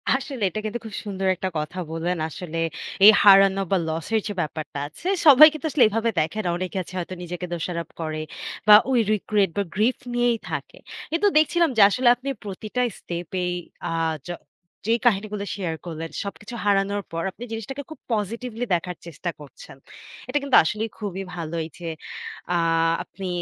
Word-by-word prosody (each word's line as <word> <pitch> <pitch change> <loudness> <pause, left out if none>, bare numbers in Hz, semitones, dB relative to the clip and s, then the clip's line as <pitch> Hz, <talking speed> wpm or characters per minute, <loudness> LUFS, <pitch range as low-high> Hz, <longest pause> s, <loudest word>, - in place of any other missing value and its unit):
আসলে 265 -4 -4
এটা 215 - -4
কিন্তু 220 +3 -3
খুব 220 - -8
সুন্দর 195 -1 -2
একটা 190 +1 -3
কথা 150 +4 -4
বললেন। 170 +2 -1
আসলে 165 +1 -6 0.5
এই 215 - +12
হারানো 195 -1 +7
বা 195 - +4
loss-এর 165 +8 -1
যে 205 - -3
ব্যাপারটা 155 -2 -5
আছে, 160 - -9 0.2
সবাই 305 +1 +10
কিন্তু 310 0 -7
আসলে 270 -6 +4
এভাবে 225 +2 0
দেখে 160 +8 -1
না। - - +1
অনেকে 185 +2 -4
আছে 185 - -13
হয়তো 180 +1 -5
নিজেকে 175 +1 -5
দোষারোপ 170 -1 -3
করে 155 -1 -3 0.5
বা 210 - +11 0.2
ওই 250 - +4
regret 205 -2 +1
বা 200 - +2
grief 220 +6 +2 0.2
নিয়েই 240 -1 +2
থাকে। - - -5 0.3
কিন্তু 335 +5 +2
দেখছিলাম 330 +1 +4
যে 215 - +6
আসলে 250 +4 +1
আপনি 255 +3 -6
প্রতিটা 210 +5 -4 0.2
step-এই, 180 +1 -3 0.4
আ - - -3 0.4
য-যেই 180 +6 -4
কাহিনীগুলো 210 -2 +1
share 170 -5 -3
করলেন, 165 -1 -5
সবকিছু 210 +3 -7
হারানোর 200 0 +2
পর 165 0 -3
আপনি 240 - -10
জিনিসটাকে 245 +6 -5
খুব 315 - -10
positively 230 +3 -3
দেখার 175 0 -1
চেষ্টা 170 +1 -5
করছেন। 145 -2 -13 0.5
এটা 290 - +1
কিন্তু 275 - +2
আসলেই 210 +7 -2
খুবই 195 -2 -4
ভালো 170 -1 -5
এইযে, 165 +1 -8 0.7
আ - - +3 0.5
আপনি 195 -1 -8
200 Hz, 165 wpm, -24 LUFS, 175-230 Hz, 0.7 s, এই